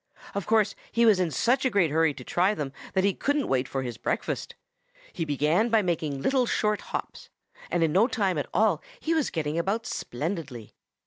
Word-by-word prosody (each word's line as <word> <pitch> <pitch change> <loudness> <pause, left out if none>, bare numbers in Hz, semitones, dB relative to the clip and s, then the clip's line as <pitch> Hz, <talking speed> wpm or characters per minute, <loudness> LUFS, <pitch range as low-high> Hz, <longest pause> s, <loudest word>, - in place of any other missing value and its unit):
Of 200 -2 -3
course 215 -2 +3 0.2
he 235 0 +3
was 215 -4 +5
in 180 -2 +1
such 245 - +1
a 260 - +3
great 195 - +2
hurry 160 -1 +2
to 125 - -9
try 185 +9 +1
them 140 -6 -4 0.2
that 190 - +2
he 200 0 +3
couldn't 285 +5 0
wait 130 -1 +1
for 135 -1 -3
his 120 -3 -5
breakfast. - - -3 0.6
He 165 - -2
began 155 - +2
by 220 -2 +3
making 155 -6 -2
little 260 -2 +2
short 210 -2 +1
hops, - - -5 0.4
and 170 - +1
in 160 - +2
no 195 +8 +4
time 195 - 0
at 145 - -4
all 210 -8 +2 0.2
he 325 - 0
was 315 -4 +1
getting 155 0 -2
about 205 +6 -1
splendidly. 145 - -5
180 Hz, 200 wpm, -27 LUFS, 150-220 Hz, 0.6 s, was